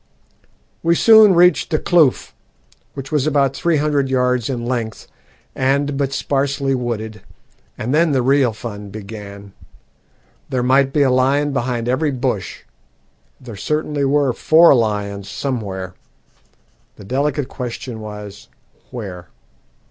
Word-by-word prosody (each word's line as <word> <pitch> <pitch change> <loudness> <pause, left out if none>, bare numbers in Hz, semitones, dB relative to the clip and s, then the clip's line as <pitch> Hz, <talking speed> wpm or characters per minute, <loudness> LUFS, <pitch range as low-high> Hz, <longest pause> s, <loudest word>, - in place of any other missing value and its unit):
"We 170 0 +2
soon 220 -1 +7
reached 180 +1 +4
the 155 - +1
kloof, 155 -5 +2 0.6
which 135 -1 -7
was 150 -1 +1
about 140 -3 +1
three 170 -2 +1
hundred 145 -2 0
yards 125 -2 0
in 120 -3 -3
length 120 -3 -3 0.5
and 140 +2 0
but 135 -1 -1
sparsely 140 0 -1
wooded, 110 -4 -4 0.6
and 120 +5 -3
then 165 +1 +3
the 130 -3 +1
real 135 -1 +3
fun 105 -2 -8
began. 100 -1 -10 1.0
There 125 -2 -1
might 135 +2 +3
be 145 0 +2
a 130 - +2
lion 135 +3 +2
behind 120 -3 -2
every 140 +5 +1
bush 125 -7 -3 0.8
there 120 -4 -10
certainly 150 +6 -2
were 140 -1 +2
four 160 +6 +5
lions 105 -4 -1
somewhere; 100 -10 -4 1.0
the - - -13
delicate 140 +4 -1
question 125 -2 -6
was, 105 -2 -9 0.4
where. 95 -8 -8
130 Hz, 125 wpm, -19 LUFS, 110-145 Hz, 1.0 s, soon